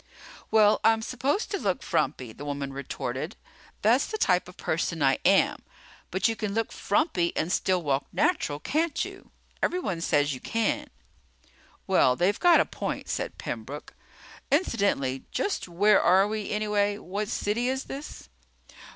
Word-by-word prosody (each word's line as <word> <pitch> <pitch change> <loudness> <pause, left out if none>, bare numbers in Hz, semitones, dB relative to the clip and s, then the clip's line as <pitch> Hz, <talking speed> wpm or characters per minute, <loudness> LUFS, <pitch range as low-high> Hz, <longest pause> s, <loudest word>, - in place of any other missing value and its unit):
"Well, 215 -1 +5
I'm 225 0 +4
supposed 270 - -1
to 400 - -1
look 190 - -1
frumpy," 120 -4 -1
the 140 - -10
woman 140 -1 -4
retorted. 140 -1 -4 0.5
"That's 235 +6 +4
the 435 - -4
type 180 - +2
of 180 - -15
person 160 -1 -1
I 135 0 +3
am. - - +3 0.5
But 190 +5 +1
you 225 - -1
can 210 -2 -3
look 225 -1 -1
frumpy 195 - +1
and 165 - 0
still 185 -2 +1
walk 140 -2 0
natural, 150 - 0
can't 315 - 0
you? - - -11 0.3
Everyone 200 - -1
says 145 -3 +2
you 130 - -6
can." 225 - -1 1.0
"Well, 180 -9 +4
they've 190 +6 +1
got 350 -1 +6
a - - +3
point," - - -5
said - - -3
Pembroke. - - -6 0.6
"Incidentally, 200 - +1
just 405 - -2
where 195 +4 +4
are 190 +3 +5
we, 215 -1 -3
anyway? 205 -1 0
What 205 +1 -4
city 225 +4 -1
is 265 +1 -1
this?" 280 +2 -8
205 Hz, 150 wpm, -27 LUFS, 165-230 Hz, 1.0 s, got